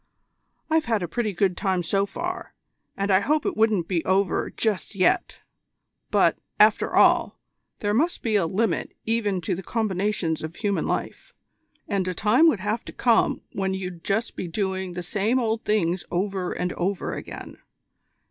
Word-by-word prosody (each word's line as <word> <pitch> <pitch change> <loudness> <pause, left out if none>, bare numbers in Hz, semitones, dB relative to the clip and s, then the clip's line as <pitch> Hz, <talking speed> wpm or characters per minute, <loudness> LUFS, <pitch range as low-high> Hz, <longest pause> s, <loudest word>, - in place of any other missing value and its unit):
I've 320 0 +2
had 225 -5 0
a - - -2
pretty 215 +5 -1
good 190 -1 +1
time 190 -3 0
so 195 +4 +1
far, 355 - -5 0.4
and 200 0 0
I 190 - +6
hope 300 +8 +1
it - - -1
won't 215 -6 +2
be 175 -4 0
over 190 0 +1
just 215 -1 -2
yet; 185 -2 +1 0.7
but, - - +3 0.2
after - - +4
all, - - +4 0.4
there 205 0 0
must 320 +10 +1
be 220 -2 +1
a 190 -5 +3
limit 195 0 -1
even 210 -5 0
to 160 - -1
the 185 - -4
combinations 195 -5 -1
of 160 +2 -6
human 205 -3 -1
life, - - -4 0.5
and 195 -3 -1
a 185 - -2
time 225 - +4
would 255 - +2
have 210 +3 -1
to - - -7
come 235 -2 +2
when 190 -1 -1
you'd 180 -3 -6
just 220 +3 -1
be 180 - -4
doing 190 0 -2
the 180 0 -5
same 210 +7 0
old 225 -2 -1
things 185 -4 +1
over 190 0 -1
and 180 0 -2
over 190 +2 -2
again. - - -8
200 Hz, 170 wpm, -25 LUFS, 185-220 Hz, 0.7 s, I